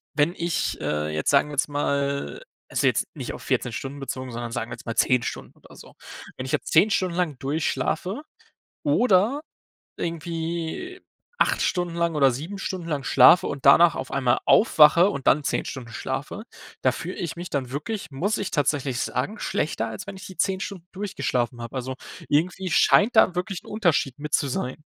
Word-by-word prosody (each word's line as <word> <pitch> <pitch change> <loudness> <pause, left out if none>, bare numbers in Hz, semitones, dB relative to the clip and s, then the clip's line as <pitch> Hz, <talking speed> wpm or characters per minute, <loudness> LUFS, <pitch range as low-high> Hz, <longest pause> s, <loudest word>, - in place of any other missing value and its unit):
wenn 150 +3 +2
ich, 170 0 -2
äh, 75 0 -1
jetzt, 75 0 -1
sagen 140 +1 +4
wir - - -8
jetzt 145 - +1
mal 140 - -1 0.3
also - - +1
jetzt - - +2
nicht - - -5
auf - - -9
14 125 - -1
Stunden 140 +4 -6
bezogen, 130 -2 -5
sondern 120 0 -5
sagen 115 0 -4
wir - - -4
jetzt - - -15
mal 115 - -3
10 125 -1 +3
Stunden - - -6
oder - - -17
so. - - -14 0.4
Wenn 130 - -5
ich - - -5
jetzt - - -1
10 180 +7 +6
Stunden 185 -4 0
lang 170 -7 -1
durchschlafe, 160 - -2 0.6
oder 240 -2 +3 0.6
irgendwie 170 - -4 0.4
8 - - +2
Stunden 175 -2 -1
lang 170 -2 0
oder 135 -3 +4
7 165 +11 -6
Stunden 185 -3 -4
lang 145 -4 -2
schlafe 135 +7 +6
und 140 -2 -5
danach 165 +4 +7
auf - - -5
einmal 125 -4 +2
aufwache 170 -2 +6
und 140 -8 -6
dann 145 +1 +3
10 - - -1
Stunden 120 -4 -7
schlafe, - - -4 0.4
da - - +4
fühle 180 - -6
ich 170 -1 -4
mich 175 +1 -6
dann 130 -3 -2
wirklich, 165 +5 -4
muss 185 +11 -1
ich 200 - -3
tatsächlich 140 -4 0
sagen, 200 - -2
schlechter, 115 - -2
als 110 - -7
wenn 195 - -6
ich 190 - -10
die 190 - -11
10 190 +1 +1
Stunden 180 -4 -6
durchgeschlafen 135 -11 -2
habe. 115 +3 -7
Also 130 +1 -3 0.3
irgendwie 180 +4 0
scheint 225 +5 +5
da 185 - +6
wirklich 180 +1 -3
'n - - -19
Unterschied 170 - 0
mit 150 0 -5
zu 140 - +2
sein. 130 +3 -4
155 Hz, 190 wpm, -24 LUFS, 135-180 Hz, 0.6 s, danach